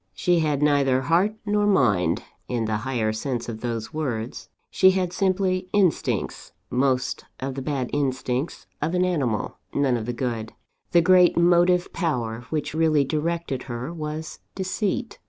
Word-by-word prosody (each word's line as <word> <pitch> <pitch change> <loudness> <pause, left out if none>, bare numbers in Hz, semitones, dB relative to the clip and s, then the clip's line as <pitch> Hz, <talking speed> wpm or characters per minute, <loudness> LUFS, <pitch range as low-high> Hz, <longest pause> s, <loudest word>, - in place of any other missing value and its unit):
"She 175 - +2
had 150 -3 +1
neither 140 -3 +3
heart 175 +9 +2
nor 205 0 +2
mind, 95 - +2 0.2
in 120 -2 -1
the 110 -1 0
higher 115 -2 -1
sense 120 +1 -3
of 110 -2 -6
those 115 -2 -4
words. 125 -7 -4 0.2
She 190 - +6
had 185 -2 0
simply 185 -1 0
instincts 195 -5 0 0.2
most 130 0 0
of 135 +1 -3
the 135 - -5
bad 135 -3 -2
instincts 130 0 -1 0.2
of 170 - 0
an 180 0 +3
animal; 135 - -1 0.2
none 135 -3 +2
of 110 -1 -5
the - - 0
good. 115 -3 -3 0.4
The 170 -1 +5
great 180 0 +5
motive 175 +1 +4
power 120 -8 -2
which 155 -2 -2
really 155 -2 +3
directed 155 -2 -2
her, 125 +7 -4
was 155 -1 -5 0.2
Deceit. 200 +4 -2
145 Hz, 155 wpm, -24 LUFS, 125-175 Hz, 0.4 s, She